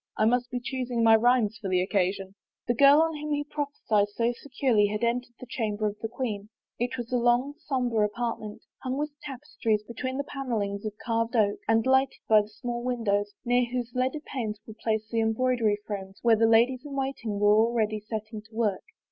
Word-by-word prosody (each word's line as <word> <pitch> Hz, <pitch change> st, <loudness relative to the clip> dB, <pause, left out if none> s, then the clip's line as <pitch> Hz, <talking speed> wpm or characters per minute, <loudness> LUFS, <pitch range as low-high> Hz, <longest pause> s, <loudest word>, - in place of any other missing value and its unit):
I 215 Hz, -, +3 dB
must 245 Hz, +2 st, +2 dB
be 250 Hz, -1 st, -3 dB
choosing 245 Hz, -2 st, -2 dB
my 225 Hz, 0 st, +7 dB
rhymes 225 Hz, -1 st, +3 dB
for 195 Hz, -, -3 dB
the 185 Hz, -1 st, +2 dB
occasion." 190 Hz, 0 st, 0 dB, 0.3 s
The 240 Hz, -, +3 dB
girl 280 Hz, +5 st, +7 dB
of 325 Hz, -, 0 dB
whom 300 Hz, 0 st, -3 dB
he 290 Hz, 0 st, 0 dB
prophesied 285 Hz, -8 st, 0 dB
so 230 Hz, +3 st, 0 dB
securely 250 Hz, -6 st, +1 dB
had 210 Hz, +2 st, -3 dB
en 235 Hz, +1 st, +2 dB
tered 240 Hz, -1 st, -24 dB
the -, -, -8 dB
chamber 215 Hz, -3 st, -2 dB
of 210 Hz, 0 st, -2 dB
the 225 Hz, -, -2 dB
queen. 220 Hz, -4 st, -4 dB, 0.3 s
It 245 Hz, +2 st, -1 dB
was 240 Hz, -1 st, -6 dB
a -, -, +4 dB
long, 240 Hz, +4 st, +2 dB
somber 245 Hz, -7 st, 0 dB
apartment, 215 Hz, 0 st, -3 dB, 0.2 s
hung 255 Hz, +1 st, -2 dB
with 300 Hz, +1 st, -2 dB
tapestries 245 Hz, -6 st, -2 dB
between 255 Hz, +4 st, -4 dB
the 280 Hz, -, -1 dB
panelings 220 Hz, -8 st, -3 dB
of 210 Hz, -, -5 dB
carved 230 Hz, +1 st, 0 dB
oak, 205 Hz, -3 st, +2 dB
and 225 Hz, 0 st, +3 dB
lighted 265 Hz, 0 st, +3 dB
by 215 Hz, -1 st, +6 dB
small 240 Hz, +3 st, -5 dB
windows, 205 Hz, -5 st, 0 dB
near 245 Hz, +1 st, +3 dB
whose 245 Hz, -1 st, -3 dB
leaded 260 Hz, +5 st, -1 dB
panes 220 Hz, -6 st, -4 dB
were 220 Hz, -, -9 dB
placed 220 Hz, -1 st, -1 dB
the 230 Hz, -1 st, +1 dB
embroidery 225 Hz, -1 st, +1 dB
frames 195 Hz, -2 st, -6 dB
where 230 Hz, -1 st, +6 dB
the 225 Hz, +1 st, +3 dB
ladies 240 Hz, +3 st, +4 dB
in 290 Hz, -2 st, -7 dB
waiting 265 Hz, -6 st, -2 dB
were 205 Hz, 0 st, +5 dB
already 220 Hz, -1 st, +2 dB
setting 215 Hz, 0 st, -6 dB
to 220 Hz, +1 st, -20 dB
work. 215 Hz, -4 st, 0 dB
230 Hz, 200 wpm, -27 LUFS, 215-255 Hz, 0.3 s, my